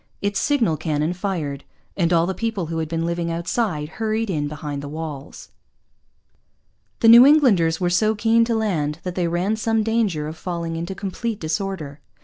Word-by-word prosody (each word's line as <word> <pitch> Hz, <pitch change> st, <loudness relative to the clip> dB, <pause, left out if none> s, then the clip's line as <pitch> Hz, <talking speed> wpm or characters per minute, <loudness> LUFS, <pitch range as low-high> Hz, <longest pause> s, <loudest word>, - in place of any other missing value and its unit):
Its 200 Hz, 0 st, -1 dB
signal 235 Hz, -, +1 dB
cannon 155 Hz, +1 st, -1 dB
fired. 170 Hz, -7 st, -3 dB, 0.3 s
And 170 Hz, -3 st, +1 dB
all 165 Hz, -1 st, +4 dB
the 190 Hz, -, -2 dB
people 220 Hz, -2 st, -2 dB
who 165 Hz, 0 st, -3 dB
had 160 Hz, -1 st, -3 dB
been 165 Hz, 0 st, -2 dB
living 170 Hz, 0 st, -2 dB
outside 170 Hz, -1 st, -2 dB
hurried 220 Hz, -1 st, 0 dB
in 150 Hz, -4 st, -1 dB
behind 145 Hz, -1 st, -5 dB
the 145 Hz, -, -7 dB
walls. 150 Hz, -2 st, -7 dB, 1.5 s
The 225 Hz, -, +5 dB
New 235 Hz, +2 st, +10 dB
Englanders 225 Hz, -, +4 dB
were 175 Hz, -1 st, 0 dB
so 215 Hz, +5 st, +2 dB
keen 225 Hz, +2 st, +3 dB
to 230 Hz, 0 st, 0 dB
land 160 Hz, -9 st, -1 dB
that 180 Hz, -, -4 dB
they 175 Hz, -1 st, -1 dB
ran 180 Hz, +6 st, 0 dB
some 225 Hz, 0 st, +1 dB
danger 210 Hz, -9 st, 0 dB
of 155 Hz, -, -6 dB
falling 170 Hz, -1 st, -4 dB
into 170 Hz, +4 st, -4 dB
complete 205 Hz, +3 st, -4 dB
disorder. 160 Hz, -3 st, -4 dB
175 Hz, 175 wpm, -22 LUFS, 160-215 Hz, 1.5 s, New